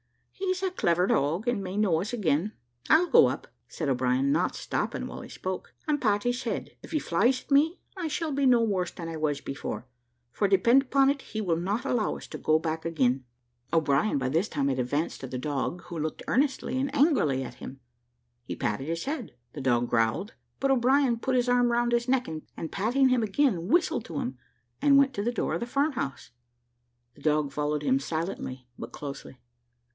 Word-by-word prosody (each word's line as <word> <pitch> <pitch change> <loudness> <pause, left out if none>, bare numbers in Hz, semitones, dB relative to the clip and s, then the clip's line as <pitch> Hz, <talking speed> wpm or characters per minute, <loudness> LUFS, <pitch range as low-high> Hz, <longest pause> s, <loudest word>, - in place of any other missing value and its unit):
"He's 370 -1 -2
a 380 - +1
clever 175 - +2
dog, 165 - +1
and 235 -5 0
may 185 +1 -5
know 185 -6 +2
us 205 - -4
again. 200 -3 0 0.4
I'll 320 +3 +6
go 470 +6 +7
up," - - -4 0.2
said 155 - -4
O'Brien, 130 +1 +1
not - - +1
stopping 60 - -2
while - - -7
he - - -10
spoke, 185 0 -5
"and 295 -1 +1
pat 205 -3 +2
his 245 +1 0
head; - - -3
if - - -12
he 320 - +1
flies 240 +6 +1
at - - -26
me, 310 +5 +4 0.2
I 360 -4 -3
shall 315 +1 -2
be 275 -1 +2
no 245 -2 +5
worse 190 -5 0
than 170 - -7
I 165 - -5
was 150 -2 0
before, 135 -3 -5 0.5
for 200 - +1
depend 215 +7 +5
upon 270 0 +3
it 280 -1 -4
he 220 - -6
will 180 -6 +1
not 195 +7 -2
allow 230 -4 0
us - - -10
to - - -7
go 155 - +3
back 160 0 -3
again." 135 -6 +1 0.5
O'Brien 155 +2 +2
by 130 -2 -1
this 165 - +1
time 140 -3 0
had 130 -1 -1
advanced 145 +6 -1
to 135 - -5
the 130 - -5
dog, 145 +6 -3
who 170 -2 -6
looked 155 0 -3
earnestly 270 0 +1
and 275 +1 -1
angrily 270 - +3
at 120 -1 -8
him. 130 +2 -9 0.6
He - - -5
patted 105 +7 -2
his 165 +4 -3
head, 275 -6 -4 0.2
the 145 - -6
dog 120 -2 +2
growled, 115 - +1 0.3
but 275 0 +2
O'Brien 260 -1 +3
put 260 +2 0
his 250 0 +2
arm 245 -1 +3
round 240 0 +1
his 240 +1 +1
neck, 255 -1 +2
and 160 0 -7
patting 245 +7 +2
him 255 -2 +3
again, 210 -5 +1
whistled 325 - +2
to 160 -4 -4
him, 125 0 -4 0.4
and 280 -1 +6
went 275 -1 +4
to 200 - -2
the 240 - 0
door 240 - -1
of - - -1
the 235 - -4
farm 280 +5 +1
house. 135 - -4 0.8
The 145 - -19
dog 150 -1 +1
followed 150 0 -1
him 135 -1 +3
silently 155 -4 -4
but - - -7
closely. 140 -2 -8
190 Hz, 210 wpm, -28 LUFS, -, 0.8 s, go